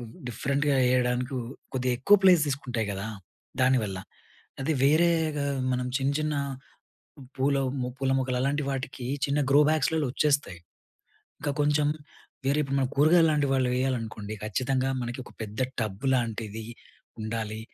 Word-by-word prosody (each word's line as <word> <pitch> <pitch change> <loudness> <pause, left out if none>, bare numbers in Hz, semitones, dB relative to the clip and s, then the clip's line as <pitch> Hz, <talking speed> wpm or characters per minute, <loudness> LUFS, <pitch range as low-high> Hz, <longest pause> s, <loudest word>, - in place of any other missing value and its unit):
ఆహ్, 115 -2 -9 0.2
డిఫరెంట్‌గా 140 +4 0 0.2
ఏయడానికి 125 +1 +1 0.4
కొద్దిగా 125 -1 0
ఎక్కువ 200 +11 +6
ప్లేస్ 180 -5 +7
తీసుకుంటాయి 125 -5 -2
కదా! 100 +2 -4 0.6
దానివల్ల 115 -7 +2 0.6
అది 135 +4 0
వేరేగా 155 -1 +3 0.3
మనం 125 0 -1
చిన్న, 135 +1 +1
చిన్న 155 0 -1 1.0
పూల 140 +1 +2 0.3
మో 125 - -2
పూల 135 -1 0
మొక్కలు 130 -1 -1
అలాంటి 145 +3 0
వాటికి 130 -2 -4 0.2
చిన్న 140 +1 0
గ్రో 140 +2 +7
బ్యాగ్స్‌లలో 155 -1 +1
వచ్చేస్తాయి. 140 - +1 0.8
ఇంకా 145 0 -1
కొంచెం 145 0 +2 0.6
వేరే 140 +2 +2
ఇప్పుడు 140 -1 -1
మనం 130 -1 0
కూరగాయలు 160 +3 +5
లాంటి 145 -2 +2
వాళ్ళు 130 -2 +2
వేయాలనుకోండి, 115 -5 -2
ఖచ్చితంగా 130 +5 0
మనకి 120 +1 -4
ఒక - - -14
పెద్ద 110 +2 -6 0.2
టబ్ 110 +4 -4
లాంటిది 110 -3 -2 0.6
ఉండాలి. 110 0 -3
130 Hz, 135 wpm, -27 LUFS, 120-145 Hz, 1.0 s, ప్లేస్